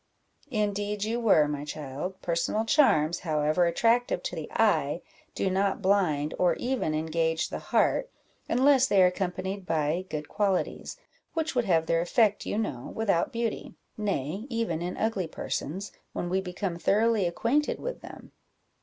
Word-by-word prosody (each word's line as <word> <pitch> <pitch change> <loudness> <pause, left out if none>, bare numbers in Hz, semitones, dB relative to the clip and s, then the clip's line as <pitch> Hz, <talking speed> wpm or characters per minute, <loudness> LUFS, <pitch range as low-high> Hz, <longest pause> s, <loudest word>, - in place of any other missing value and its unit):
"Indeed 205 -3 -1
you 225 +3 -1
were, 200 -10 +4
my 145 -1 -3
child; 150 +5 -5
personal 175 +6 0
charms, 175 - +3
however 155 +1 +1
attractive 230 +8 +2
to - - -3
the - - -6
eye, - - +1 0.3
do - - 0
not 195 +1 +1
blind, 180 -7 +1
or 175 -2 +3
even 245 -11 -1
engage 160 +1 0
the - - -4
heart, - - +1 0.4
unless 265 +1 +4
they 195 -7 +5
are - - +7
accompanied 185 +1 -2
by 160 +3 0
good 150 -1 -4
qualities, 200 - -1 0.4
which 320 -1 -1
would 245 -3 +1
have 165 -4 +2
their 165 0 +2
effect, 205 +3 +2
you - - -1
know, 165 - -3
without 200 -6 +1
beauty 230 -1 -3 0.2
nay, 200 - -2
even 230 -9 -1
in 180 +1 -4
ugly 210 -6 -1
persons, 180 +4 -4 0.2
when 175 - -3
we 190 +2 +1
become 180 -1 -4
thoroughly 215 0 +2
acquainted 245 +12 0
with - - -5
them. - - -11
190 Hz, 155 wpm, -28 LUFS, 165-220 Hz, 0.4 s, are